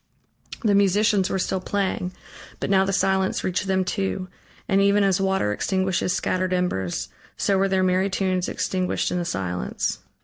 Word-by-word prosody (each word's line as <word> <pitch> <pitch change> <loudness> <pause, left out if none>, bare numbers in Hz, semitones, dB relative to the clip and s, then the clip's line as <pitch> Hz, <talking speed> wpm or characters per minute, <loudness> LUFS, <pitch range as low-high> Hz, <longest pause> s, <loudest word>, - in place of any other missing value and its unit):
The 210 -3 +3
musicians 200 0 +3
were - - 0
still 190 0 -1
playing, 185 -1 -2 0.5
but - - -2
now 190 -1 +4
the 195 - -1
silence 190 0 +1
reached 185 +1 -1
them 190 -1 +1
too, 190 -1 -2 0.4
and 195 -1 +3
even 200 +1 +4
as 195 -1 +2
water 190 - +1
extinguishes 190 - 0
scattered 185 +1 0
embers, 95 - -1 0.3
so 200 - +1
were 195 - +3
their 190 -1 +1
merry 185 +1 +2
tunes 185 -2 0
extinguished 185 -1 -1
in 180 - 0
the 175 - -2
silence. 95 - -2
190 Hz, 165 wpm, -24 LUFS, 180-195 Hz, 0.5 s, now